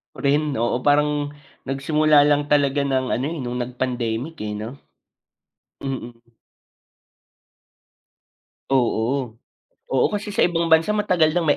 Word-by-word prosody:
Ako - - -10
rin, 145 +1 +1
oo. 120 +2 0
Parang 145 +1 +2 0.4
nagsimula 150 +2 +3
lang 145 0 +2
talaga 145 -1 +2
ng 130 -1 0
ano, 130 - 0
eh, 170 - -4
no'ng 125 0 -4
nag-pandemic, 125 +3 -3
eh, 105 - -4
'no? 115 +6 -7 1.0
Mm. 120 -3 -5 2.5
Oo. 120 -1 0 0.5
Oo, 130 - +3
kasi 210 0 -3
sa 200 - +2
ibang 170 -1 -1
bansa 160 +6 +4
matagal 180 -7 +2
nang 170 -3 0
may 145 - +4
140 Hz, 125 wpm, -22 LUFS, 125-155 Hz, 2.5 s, bansa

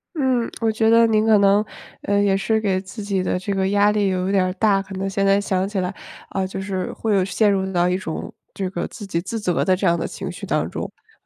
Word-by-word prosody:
嗯， 260 -5 +1
我 225 -1 +1
觉 220 0 +2
得 230 0 +6
您 215 0 +2
可 220 -2 +5
能， 200 +1 +4 0.4
呃， 200 0 +1
也 195 -1 +3
是 220 +3 +1
给 190 -3 0
自 200 +3 -9
己 195 -2 -1
的 180 - -1
这 200 +2 -3
个 190 0 0
压 205 +1 +4
力 205 -2 +1
有 185 0 -1
点 195 -2 +3
儿 185 0 -1
大。 200 -1 +2
可 195 0 -10
能 195 +1 -2
现 195 0 0
在 195 +1 +4
想 190 -1 -1
起 200 -2 -2
来， 180 +2 -2 0.4
呃， 190 -1 -1
就 190 0 -5
是 190 -2 -3
会 220 -2 -1
有 190 - +3
陷 210 +2 +2
入 190 -1 -1
到 175 -1 +2
一 180 +1 +1
种， 165 -4 -6 0.2
这 190 -2 -3
个 175 - -3
自 205 - -9
己 170 -2 -1
自 225 +5 -4
责 180 -4 0
的 185 - +3
这 185 0 0
样 170 0 +3
的 - - -3
情 190 -1 -6
绪 180 - -7
当 - - -1
中。 - - -5
呃， 445 - -12
195 Hz, 290 characters per minute, -21 LUFS, 185-210 Hz, 0.4 s, 得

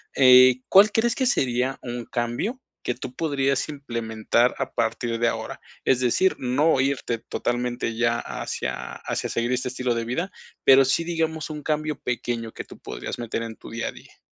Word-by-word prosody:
eh, 130 -1 +7
¿cuál 205 +2 +7
crees 225 +2 +2
que 260 - +1
sería 130 - +1
un 120 -1 -5
cambio 120 - -2 0.2
que 125 - -1
tú 125 0 -7
podrías 140 -2 0
implementar 115 -4 0
a - - -2
partir 115 0 -1
de 120 - +3
ahora? 115 -1 -3 0.2
Es 130 - +3
decir, 130 +10 +2
no 135 +4 +2
irte 130 -4 -1
totalmente 120 0 -2
ya 115 0 +2
hacia - - -4
hacia - - -2
seguir 120 +1 -1
este 125 0 0
estilo 125 -1 -1
de 115 - -1
vida, 165 +11 -2 0.3
pero 135 0 +8
sí, 135 +6 +2
digamos, 160 -2 -2
un 150 -1 -6
cambio 155 -1 -1
pequeño 120 -2 -3
que - - -6
tú - - -14
podrías - - -6
meter 115 -1 -3
en 115 -1 -6
tu - - -12
día 115 +1 -2
a - - -6
día. - - -17
125 Hz, 180 wpm, -24 LUFS, 120-150 Hz, 0.3 s, pero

